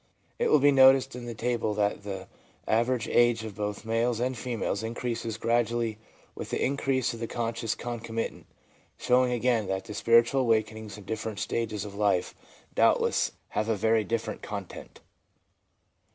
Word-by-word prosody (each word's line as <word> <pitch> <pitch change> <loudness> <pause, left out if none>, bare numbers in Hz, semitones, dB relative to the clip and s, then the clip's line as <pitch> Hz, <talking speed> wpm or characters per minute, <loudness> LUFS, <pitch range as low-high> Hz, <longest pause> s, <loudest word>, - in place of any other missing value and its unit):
It - - +2
will - - +6
be 145 0 +5
noticed 135 -1 +6
in 120 -1 -7
the 120 - -5
table 115 -2 -1
that 105 0 0
the 95 -2 -6 0.4
average 120 +2 +1
age 120 -2 +3
of 110 -2 -6
both 105 +1 -4
males 115 +1 0
and 125 +2 -1
females 115 -3 -2
increases 115 -1 -3
gradually 115 -1 0 0.3
with - - -7
the - - -2
increase 130 -2 0
of 115 - -8
the 115 - -3
conscious 115 -1 -2
concomitant, 115 -1 -5 0.5
showing 125 0 +3
again 120 -3 +1
that 95 +3 -4
spiritual 115 +5 +4
awakenings 110 -3 0
in 105 - -11
different 110 0 -4
stages 110 -3 -2
of 100 - -8
life 100 -3 +1 0.4
doubtless - - +2 0.2
have 110 +1 -1
a 110 - +2
very 110 +2 +2
different 115 0 -3
content. 100 -3 -8
115 Hz, 150 wpm, -28 LUFS, 105-120 Hz, 0.5 s, will